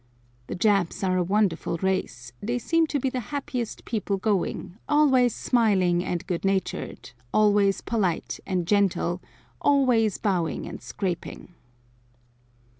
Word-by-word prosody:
The - - -4
Japs 195 -2 +1
are 185 -1 +2
a - - +2
wonderful 185 -3 0
race; 185 -10 -2
they 240 +4 -1
seem 330 +6 +2
to 290 - -1
be 265 0 -1
the 255 - -2
happiest 255 -5 -4
people 205 -3 -1
going, 200 -1 -2
always 265 -6 +4
smiling 190 -8 +2
and 175 -2 -3
good 175 -2 -3
natured, 195 -8 -2 0.2
always 205 -2 +3
polite 195 -8 -1
and 180 -3 0
gentle, 185 -2 +1 0.4
always 250 -7 +3
bowing 180 -6 -1
and - - -8
scraping. 180 -2 -5
200 Hz, 125 wpm, -26 LUFS, 180-235 Hz, 0.4 s, always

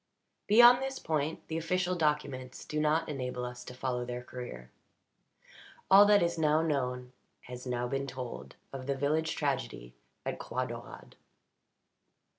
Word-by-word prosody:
Beyond 240 +4 +8
this 270 0 -3
point 155 0 -2
the 160 0 -2
official 180 +2 0
documents 150 -6 -2
do 150 - -3
not 155 +2 +2
enable 125 -4 -4
us 125 0 -7
to 125 - -9
follow 125 -1 -2
their 125 0 -5
career. 90 - -8 1.2
All 200 +1 +9
that 205 -3 +5
is 170 -1 -1
now 155 0 +3
known 125 -5 -2 0.3
has 125 +1 -9
been 125 - -3
now 125 0 -1 0.2
told 125 -1 -7 0.2
of 130 -1 -6
the 140 - 0
village 155 +4 0
tragedy - - -3 0.3
at - - -3
Croix 130 0 -2
Daurade. 120 -1 -9
140 Hz, 145 wpm, -31 LUFS, 125-160 Hz, 1.2 s, All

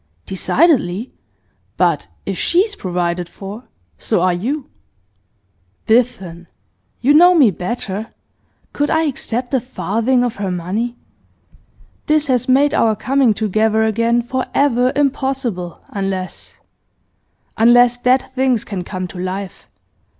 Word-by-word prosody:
'Decidedly. 230 - +1 0.6
But - - +1 0.2
if - - -3
she 345 +2 +2
is 420 +1 -2
provided 175 -1 -2
for, 205 +7 -9 0.3
so - - 0
are 180 0 +2
you.' 260 +11 -3 1.2
'Biffen, 220 -8 0 0.5
you 275 +4 +4
know 355 +4 +7
me 270 -10 +5
better. 200 +3 -4 0.7
Could 290 0 0
I 320 0 +2
accept 250 -3 -3
a 265 - +3
farthing 245 0 0
of 245 -2 -2
her 200 -1 -3
money? 195 +8 -3 1.1
This 305 0 +3
has 255 -2 0
made 280 +3 +4
our 225 -7 +2
coming 255 0 +2
together 220 +1 +1
again 230 +2 +1
for 255 +2 -3
ever 255 -3 +3
impossible, 265 - -1
unless 195 -2 -5 1.0
unless 240 +2 +5
dead 250 +1 +2
things 260 -3 +1
can 190 -4 -5
come 185 0 -5
to 180 - -9
life. 185 +1 -5
235 Hz, 120 wpm, -18 LUFS, 195-265 Hz, 1.2 s, know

